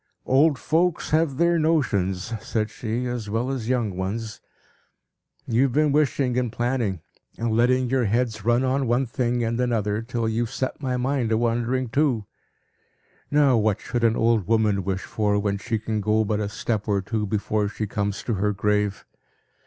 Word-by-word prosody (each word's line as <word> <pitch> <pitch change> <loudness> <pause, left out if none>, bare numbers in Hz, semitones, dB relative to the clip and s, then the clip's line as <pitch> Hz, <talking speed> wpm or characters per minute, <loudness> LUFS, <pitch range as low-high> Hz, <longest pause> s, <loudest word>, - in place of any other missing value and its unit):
"Old 145 +2 +4
folks 170 +4 0
have 155 -3 +2
their 170 +1 +3
notions," 115 - 0
said 110 -1 -2
she, 120 +3 -3
"as 120 -4 -4
well 115 +5 -1
as 125 -4 -4
young 115 -7 0
ones. 105 +4 -4 1.0
You've 125 +2 +2
been 150 +1 +3
wishing 135 -4 +1
and 125 -3 -2
planning; 120 -7 -1 0.4
and 115 0 -1
letting 125 +2 +3
your 130 -1 +1
heads 110 -1 0
run 120 +3 +2
on 130 0 0
one 120 +3 +2
thing 120 0 -1
and 115 +1 -1
another, 110 -3 0
till 115 -1 -2
you've 115 +1 -1
set 130 +2 -3
my 130 -2 -1
mind 125 -2 0
a 110 - +3
wandering 120 +2 0
too. 130 -4 +1 1.0
Now 145 -4 +4
what 105 -2 +1
should 120 -1 -3
an 115 -1 +4
old 115 -5 +2
woman 105 -4 +2
wish 95 0 -2
for, 105 -1 0
when 100 -1 -1
she 115 +2 -2
can 110 0 -2
go 110 +1 +2
but 105 0 -1
a 105 -1 -2
step 105 0 -3
or 100 -2 +1
two 105 +1 -2
before 105 0 0
she 110 +1 -4
comes 100 0 -3
to 120 - -1
her 105 +1 0
grave? 105 0 0
115 Hz, 175 wpm, -24 LUFS, 105-130 Hz, 1.0 s, Old